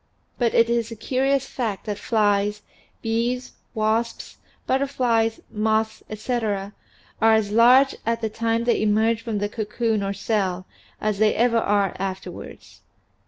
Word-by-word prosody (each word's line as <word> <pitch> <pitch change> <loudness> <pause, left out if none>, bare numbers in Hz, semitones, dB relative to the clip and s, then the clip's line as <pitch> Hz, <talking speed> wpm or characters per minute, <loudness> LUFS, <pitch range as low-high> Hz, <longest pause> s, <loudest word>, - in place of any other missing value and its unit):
But 235 -2 +1
it 230 - +5
is 235 -1 0
a 230 - -7
curious 270 +4 0
fact 225 -8 -4
that 210 -2 -4
flies, 210 -1 +1 0.4
bees, 240 +3 -1 0.2
wasps, 220 +2 -1 0.3
butterflies, 245 -5 +1
moths, 220 0 0
etc., 215 -3 -2 0.5
are 225 0 +6
as 210 -2 0
large 250 +5 +6
at 230 +1 0
the 225 - -1
time 230 +1 -1
they 235 - +1
emerge 220 +1 +2
from 225 -2 -3
the 205 0 -1
cocoon 220 0 -1
or 195 0 -2
cell 195 -3 -1 0.3
as 210 -2 -1
they 215 -1 +3
ever 235 0 +3
are 200 -3 +1
afterwards. 190 -1 -7
225 Hz, 140 wpm, -23 LUFS, 210-235 Hz, 0.5 s, are